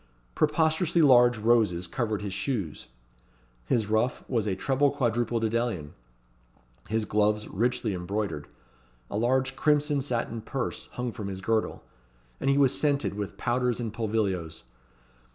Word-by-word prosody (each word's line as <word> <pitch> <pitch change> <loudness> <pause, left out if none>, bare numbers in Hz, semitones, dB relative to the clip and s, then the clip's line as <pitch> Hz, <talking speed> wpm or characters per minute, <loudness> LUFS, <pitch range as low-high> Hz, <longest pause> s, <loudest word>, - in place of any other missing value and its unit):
Preposterously 160 +2 +2
large 120 -3 +6
roses 105 -5 +2
covered 110 0 -2
his 100 -2 -4
shoes; 100 - -3 0.8
his 110 - +2
ruff 110 +4 0
was 115 -5 0
a 95 - 0
"treble 135 +7 +2
quadruple 120 -4 0
dedalion;" 115 -9 -1 1.0
his 110 0 0
gloves 105 +1 +1
richly 120 +1 0
embroidered; 90 -4 -3 0.6
a - - -2
large 130 +4 +1
crimson 145 0 +2
satin 115 -3 -2
purse 125 +3 -4
hung 125 -1 -3
from 105 -3 -6
his 95 -1 -5
girdle; 110 +3 -1 0.6
and - - 0
he 140 - +3
was 135 -2 +4
scented 145 -5 +1
with 100 -1 -5
powders 125 0 0
and 115 -3 -3
pulvilios. 100 -8 -2
115 Hz, 135 wpm, -27 LUFS, 105-130 Hz, 1.0 s, large